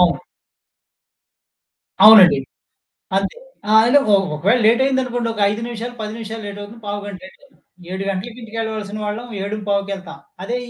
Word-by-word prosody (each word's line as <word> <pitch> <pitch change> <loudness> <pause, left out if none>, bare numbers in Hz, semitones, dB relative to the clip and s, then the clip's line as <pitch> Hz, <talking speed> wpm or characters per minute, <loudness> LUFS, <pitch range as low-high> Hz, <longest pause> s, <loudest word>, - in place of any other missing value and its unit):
అవును. 175 -1 +3 1.8
అవునండి. 210 -8 +9 0.8
అంతే. 195 0 -1 0.3
ఆ! - - -1
అంటే 245 +5 +5
ఒ - - +7 0.2
ఒకవేళ 195 +11 +2
లేటయిందనుకోండి, 250 0 +1
ఒక 210 - -6
5 210 +2 -4
నిమిషాలు, 240 +1 -6
10 215 -1 -5
నిమిషాలు 225 -1 -7
లేటవుతుంది. 205 +3 -9
పావుగంట 205 -1 -5
లేటవుతుంది. 265 +9 -18 0.3
7 190 +1 -4
గంటలకి 205 +5 -5
ఇంటికెళ్ళాల్సిన 220 -2 -5
వాళ్ళం, 215 +4 -4 0.2
ఏడుం 210 +2 -4
పావుకెళ్తాం. 200 -5 -3 0.2
అదే 240 +5 -3
215 Hz, 130 wpm, -19 LUFS, 200-235 Hz, 1.8 s, అవునండి